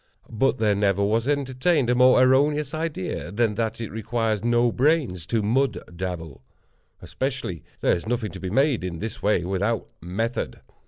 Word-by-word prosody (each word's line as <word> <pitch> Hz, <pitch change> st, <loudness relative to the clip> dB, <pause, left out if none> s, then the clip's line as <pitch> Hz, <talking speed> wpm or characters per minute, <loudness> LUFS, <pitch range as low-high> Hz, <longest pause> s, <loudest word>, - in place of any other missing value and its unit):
But 130 Hz, +4 st, +1 dB
there 110 Hz, -3 st, +2 dB
never 100 Hz, -1 st, +1 dB
was 110 Hz, +4 st, +1 dB
entertained 140 Hz, +1 st, +1 dB
a 125 Hz, -, +3 dB
more 125 Hz, +1 st, +6 dB
erroneous 145 Hz, +3 st, +3 dB
idea 150 Hz, -, -3 dB
than 110 Hz, +1 st, +1 dB
that 110 Hz, +1 st, -2 dB
it 115 Hz, -, -5 dB
requires 115 Hz, -1 st, -1 dB
no 120 Hz, 0 st, +3 dB
brains 125 Hz, -, +1 dB
to 115 Hz, -3 st, 0 dB
mud 130 Hz, +6 st, +1 dB, 0.2 s
dabble. 85 Hz, -7 st, -5 dB, 0.6 s
Especially, 130 Hz, -, -3 dB, 0.2 s
there -, -, +3 dB
is 85 Hz, -, -6 dB
nothing 115 Hz, -4 st, -1 dB
to -, -, -9 dB
be 95 Hz, -, -4 dB
made 135 Hz, +1 st, +2 dB
in 90 Hz, -2 st, -4 dB
this 110 Hz, +5 st, -6 dB
way 105 Hz, -4 st, +2 dB
without 100 Hz, +5 st, -1 dB, 0.2 s
method. 110 Hz, +8 st, -3 dB
115 Hz, 165 wpm, -24 LUFS, 100-130 Hz, 0.6 s, more